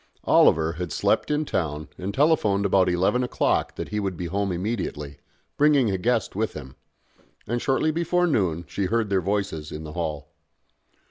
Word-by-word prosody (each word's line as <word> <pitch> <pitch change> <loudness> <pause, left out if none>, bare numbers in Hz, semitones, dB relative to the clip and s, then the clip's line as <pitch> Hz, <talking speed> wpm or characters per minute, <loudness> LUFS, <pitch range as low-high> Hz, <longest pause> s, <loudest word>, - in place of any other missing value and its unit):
Oliver 80 0 +4
had 90 +2 -5
slept - - +1
in 150 +1 0
town 75 - -2
and 95 +2 -4
telephoned 105 -7 +2
about 95 -2 +3
eleven 95 +8 +1
o'clock 125 - 0
that - - -5
he 105 - -2
would 95 -4 -3
be 90 - -4
home 100 +3 -1
immediately, 85 - -4 0.4
bringing 145 -6 +4
a 95 - -1
guest 115 0 0
with 110 +2 -1
him: 65 -3 -9 0.7
and 120 +2 -2
shortly 135 +4 +1
before 170 +2 +1
noon 90 - 0
she 100 - -2
heard 110 +1 0
their 95 -1 +2
voices 95 -5 -2
in 75 - -6
the 75 -1 -8
hall. 75 -4 -4
100 Hz, 175 wpm, -24 LUFS, 85-120 Hz, 0.7 s, Oliver